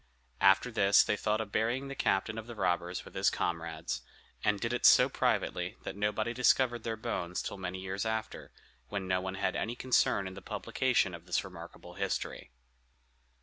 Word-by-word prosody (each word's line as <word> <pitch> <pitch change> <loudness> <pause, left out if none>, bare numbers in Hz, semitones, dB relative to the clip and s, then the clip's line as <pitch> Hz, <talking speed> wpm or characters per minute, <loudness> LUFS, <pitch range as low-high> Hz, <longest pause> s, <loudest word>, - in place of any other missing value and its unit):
After 95 +5 +5
this 100 -3 +5
they - - 0
thought 105 +1 0
of 105 -2 -6
burying 120 +6 0
the 140 - -5
captain 110 -3 0
of 110 - -9
the 120 - -8
robbers 90 -2 -1
with - - -12
his - - +3
comrades, 80 -1 -3 0.4
and 105 -1 +2
did 115 +3 -1
it 120 - -2
so - - +7
privately - - -1
that - - -5
nobody 105 +3 -1
discovered 125 -1 +3
their 115 0 -3
bones 90 -6 -3
till 100 - -5
many 95 0 -4
years 95 +1 -3
after, 110 0 -4 0.4
when 100 -2 -4
no 90 0 +1
one 95 0 -4
had 100 -1 -1
any 115 +2 -2
concern 120 -6 +2
in 95 - -7
the 95 - -9
publication 115 +1 0
of 85 +1 -10
this 90 - +1
remarkable 90 -1 -10
history. 100 +1 -3
100 Hz, 185 wpm, -31 LUFS, 95-115 Hz, 0.4 s, so